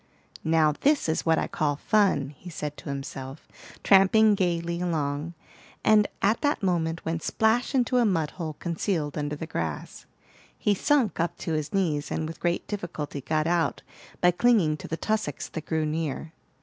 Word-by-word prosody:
"Now 160 -1 +3
this 290 - +3
is 160 +1 -1
what 160 0 +4
I - - +1
call 145 -2 -1
fun," 170 -6 +2
he 175 - -11
said 150 -3 -5
to - - -8
himself, 135 0 -6 0.4
tramping 210 +2 +6
gayly 170 -2 -1
along, 155 -1 -2 0.5
and 210 -1 +5 0.2
at 215 +3 +3
that 290 -7 0
moment 165 -3 0
went 165 0 -2
splash 225 - +1
into 250 0 +2
a 245 - +4
mud 165 -8 +1
hole 160 -3 -5
concealed 165 -2 -2
under 150 0 -2
the 160 - -5
grass. 80 - -5 0.5
He 210 - +2
sunk 255 - +1
up 170 +1 -1
to 165 - -3
his 155 -1 -2
knees, 160 -7 0
and 155 - -2
with 165 -1 -8
great 175 0 -1
difficulty 155 -8 -5
got 155 +3 0
out 170 0 0 0.4
by 180 - +6
clinging 180 -5 +3
to - - -9
the 160 - -3
tussocks 215 -10 -2
that 160 - -7
grew 160 -1 0
near. 155 0 -3
165 Hz, 175 wpm, -26 LUFS, 155-195 Hz, 0.5 s, tramping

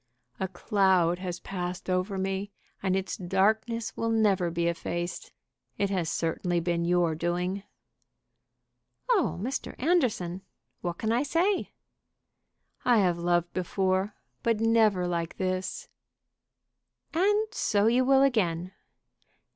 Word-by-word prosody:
"A 190 - 0
cloud 185 -2 +2
has 180 -1 -4
passed 180 -1 -5
over 185 +2 0
me, 195 +1 -2 0.3
and 190 -1 +1
its 190 0 -2
darkness 215 +5 0
will 230 - -1
never 205 -6 +2
be 170 0 -1
effaced. 175 +1 -3 0.5
It 200 -1 0
has 180 -5 0
certainly 170 +1 0
been 170 0 0
your 175 -2 +2
doing." 175 +4 -1 1.5
"Oh, 400 - +2
Mr. 255 +8 -3
Anderson! 240 - +1 0.4
what 175 -1 -3
can 220 - -1
I 235 +2 +2
say?" 340 +7 +1 1.1
"I 245 -2 +4
have 180 -4 +2
loved 175 0 +1
before, 190 +2 0 0.3
but 230 -2 +1
never 220 -5 +3
like 170 -1 -2
this." 185 0 -2 1.3
"And 415 +6 +2
so 205 - +1
you 240 +3 +4
will 270 +1 +5
again." 185 -9 +1
190 Hz, 120 wpm, -28 LUFS, 175-225 Hz, 1.5 s, will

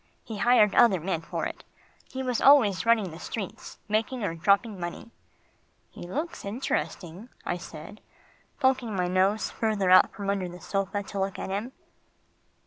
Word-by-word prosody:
He 220 - -7
hired 235 -4 +4
other 225 -7 +5
men 170 0 -2
for 165 - -4
it. - - -6 0.5
He 265 0 -5
was 250 -2 -1
always 230 -8 +5
running 220 -6 +3
the 160 - -10
streets, 200 0 -7
making 220 +3 -1
or 185 - -1
dropping 200 +5 +1
money." 175 +6 -6 0.8
"He 175 - -9
looks 305 - -4
interesting," 200 -2 -4 0.2
I 175 - -1
said, 170 +3 -10 0.6
poking 260 -5 +1
my 180 -1 0
nose 190 +4 +1
further 210 -4 0
out 185 - +7
from 200 -1 -3
under 190 -3 -2
the 175 +1 -10
sofa 195 +3 -2
to 200 0 -6
look 195 0 -2
at - - -5
him. 215 +7 -3
200 Hz, 160 wpm, -27 LUFS, 185-230 Hz, 0.8 s, out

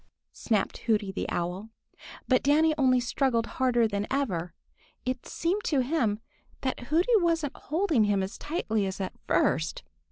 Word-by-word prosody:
snapped 215 -4 -1
Hooty 210 -3 +2
the 190 - -4
Owl. 180 +5 -3 0.6
But 255 -1 +4
Danny 310 +3 +4
only 260 -3 +4
struggled 245 -1 +1
harder 240 -2 +2
than 205 0 -2
ever. 180 -12 -1 0.5
It 255 0 -3
seemed 370 +5 -1
to 280 -4 +2
him 240 -7 0 0.4
that 255 -2 -3
Hooty 350 +10 +3
wasn't 330 -6 +1
holding 315 - +1
him 200 -2 +1
as 190 - -6
tightly 220 - -1
as 190 +1 -5
at 190 - -3
first. 160 - +1
250 Hz, 150 wpm, -28 LUFS, 205-295 Hz, 0.6 s, But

